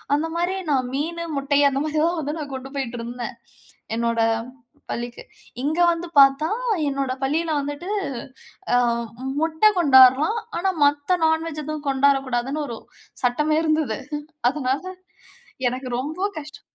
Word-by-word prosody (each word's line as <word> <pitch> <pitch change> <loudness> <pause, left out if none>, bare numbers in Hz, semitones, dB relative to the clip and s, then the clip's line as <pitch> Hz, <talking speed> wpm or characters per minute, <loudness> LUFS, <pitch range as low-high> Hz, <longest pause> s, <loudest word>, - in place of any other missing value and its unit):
அந்த 310 +3 0
மாரி 350 +2 0
நா 290 - +3 0.2
மீனு, 335 +5 -2
முட்டை 280 +1 +1
அந்த 270 0 -1
மாரி 310 0 -2
தான் 340 +1 0
வந்து 295 0 -3
நா - - -3
கொண்டு 265 0 -6
போயிட்டுருந்தேன், 240 -2 -4 0.6
என்னோட 230 0 0 0.7
பள்ளிக்கு. 240 0 -5 0.4
இங்க 310 +4 0
வந்து 340 +1 -3
பார்த்தா, 275 +3 +5 0.4
என்னோட 275 -1 -2
பள்ளியில 315 +4 0
வந்துட்டு 290 +6 -5 0.9
அ - - +6 0.6
முட்ட 320 +1 -2 0.2
கொண்டாரலாம், 275 - +6 0.2
ஆனா 380 +2 +1
மத்த 290 +5 +2
நான்வெஜ் 320 -1 0
எதுவும் 305 0 -5
கொண்டாரக்கூடாதுன்னு 270 +1 +1
ஒரு 235 - -6 0.5
சட்டமே 300 +5 +2
இருந்தது. 310 -8 0 0.5
அதுனால, 270 +1 -1 0.8
எனக்கு 255 +2 -3
ரொம்போ 315 +8 -4 0.2
கஷ்டம் 295 -1 -11
285 Hz, 125 wpm, -23 LUFS, 260-315 Hz, 0.9 s, அ